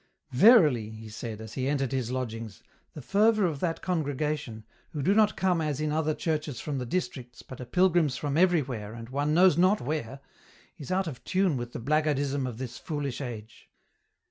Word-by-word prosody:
" 155 - -46
Verily," 145 - +6
he 110 0 -10
said, 110 0 -6
as 110 -1 -9
he 130 -1 -2
entered 135 -3 0
his 130 -4 -2
lodgings, 115 -5 -5
" - - -40
the 150 - -8
fervour 210 - +3
of 155 -5 -2
that 165 0 -2
congregation, 150 - -2 0.3
who 145 -3 -3
do 190 - +3
not 215 0 +3
come 180 -3 +1
as 150 -3 -2
in 155 0 -1
other 155 0 0
churches 155 -5 -2
from 145 -3 -3
the 125 - -4
districts, 125 -7 -4
but 130 - -10
are - - -6
pilgrims 175 -3 +2
from 145 +2 -2
every 175 -2 +4
where 110 -4 -6
and 115 0 -9
one 145 +3 0
knows 180 -2 +5
not 185 +4 +4
where, 135 -2 -4 0.6
is 145 - -7
out 190 +1 +1
of 145 -7 -7
tune 185 -4 +1
with 120 -1 -5
the - - -5
blackguardism 145 0 0
of 120 -3 -6
this 125 -1 -6
foolish 145 -5 -4
age." 115 -4 -8
145 Hz, 200 wpm, -28 LUFS, 125-165 Hz, 0.6 s, Verily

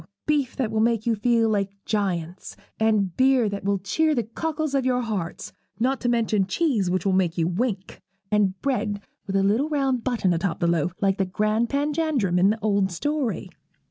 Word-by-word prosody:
Beef 290 -4 0
that 240 -5 -1
will 220 - 0
make 230 -1 +1
you 235 - +2
feel 230 +1 +2
like 200 -2 -1
giants, 185 -4 -3 0.2
and 215 -5 +1
beer 260 -3 +4
that 200 -1 -4
will 200 0 +1
cheer 305 +12 +1
the 240 - +1
cockles 310 +6 -3
of 275 -1 +2
your 250 -1 +1
hearts; 205 -8 -4 0.3
not 260 +3 0
to 245 - 0
mention 220 -5 +1
cheese 220 - +1
which 185 0 -1
will 195 - +2
make 185 -2 +1
you 165 -1 +1
wink, 195 +1 -3 0.3
and 200 -3 +2
bread 215 -6 -1 0.3
with 195 - -3
a 195 - +3
little 225 +10 +2
round 270 -5 0
button 230 -8 +1
atop 170 +1 -1
of - - -25
the 170 0 +3
loaf 170 +4 -2
like 195 -1 +1
the 195 - +2
grand 215 +5 0
Panjandrum 285 - 0
in 190 +2 +5
the 215 - +1
old 200 -3 +1
story.' 225 - -2
215 Hz, 200 wpm, -24 LUFS, 190-255 Hz, 0.3 s, in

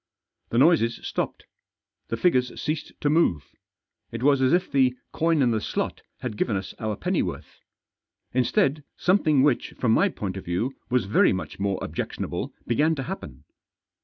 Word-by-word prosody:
The 115 - -1
noises 135 -4 +4
stopped; - - -3 0.6
the 115 - -3
figures 125 -3 +1
ceased 155 -1 -3
to - - +1
move; 95 - +2 0.6
it 115 +1 -5
was 140 -1 +4
as 130 0 +4
if 180 +1 +2
the 130 -2 +3 0.2
coin 165 -3 +2
in 120 - +3
the 110 -1 0
slot - - -3 0.2
had 115 -5 -4
given 110 - 0
us 95 - -6
our 110 -1 -2
pennyworth. - - -3 0.7
Instead, 140 - +2
something 155 -7 +3
which, 145 -4 +1
from 120 - +1
my 195 - +4
point 100 - -5
of 95 - -7
view, 90 +10 -1 0.2
was 125 -4 +2
very 100 - +4
much 95 - -5
more 100 -1 0
objectionable - - -4
began 150 +7 +2
to 135 - -3
happen. 190 +7 -7
130 Hz, 160 wpm, -25 LUFS, 110-155 Hz, 0.7 s, noises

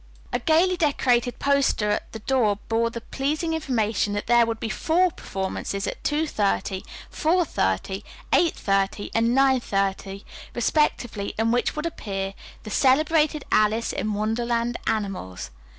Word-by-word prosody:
A - - +1
gayly 335 +7 +3
decorated 250 -6 +1
poster 280 -7 +2
at 210 - -2
the - - -6
door 220 -2 +1
bore 230 +1 +1
the 235 0 -7
pleasing 305 +7 -2
information 225 -9 0
that 205 - -2
there 240 0 +4
would 225 -1 -3
be - - -3
four 340 +10 +2
performances, 195 -3 -4
at - - -5
two 300 +2 +1
thirty, 200 -6 -1 0.3
four 345 +3 +2
thirty, 145 - -1 0.3
eight 340 -2 +4
thirty, 195 0 -1
and 230 +2 +2
nine 270 -1 +4
thirty, 195 -2 -2 0.3
respectively, 240 -5 0
in 225 +1 +2
which 245 +1 +1
would 300 +1 -3
appear 195 -11 -4 0.3
the 215 - -8
"Celebrated 300 +3 +3
Alice 215 +2 +2
in 215 -1 -2
Wonderland 235 +2 -1
Animals." 185 - -3
230 Hz, 145 wpm, -24 LUFS, 205-280 Hz, 0.3 s, there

